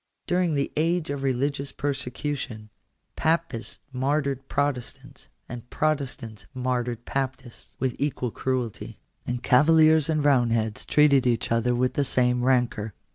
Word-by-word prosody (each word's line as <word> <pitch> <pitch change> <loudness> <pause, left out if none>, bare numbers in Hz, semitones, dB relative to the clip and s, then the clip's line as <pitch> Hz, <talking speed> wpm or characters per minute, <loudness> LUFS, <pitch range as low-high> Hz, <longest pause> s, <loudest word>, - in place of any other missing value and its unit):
During 175 -3 +1
the 140 0 -1
age 165 0 0
of 140 -1 -3
religious 140 +1 -1
persecu 140 +1 -3
tion, 110 -6 -7 0.4
Papists 160 -8 -1
martyred 135 0 -1
Protestants, 140 -4 -3 0.2
and 125 -1 -8
Protestants 130 -8 -2
martyred 125 -2 -2
Papists, 130 -2 -5
with 130 -1 -1
equal 130 -4 -1
cruelty; 125 -4 -3 0.3
and 125 0 -3
Cavaliers 155 +3 +5
and 155 -2 +1
Eoundheads 115 -6 +1
treated 140 -4 +4
each 115 -2 0
other 115 +1 +2
with 125 +1 +1
the 145 - +1
same 125 -2 +1
rancour. 120 -5 +1
130 Hz, 130 wpm, -25 LUFS, 120-145 Hz, 0.4 s, Cavaliers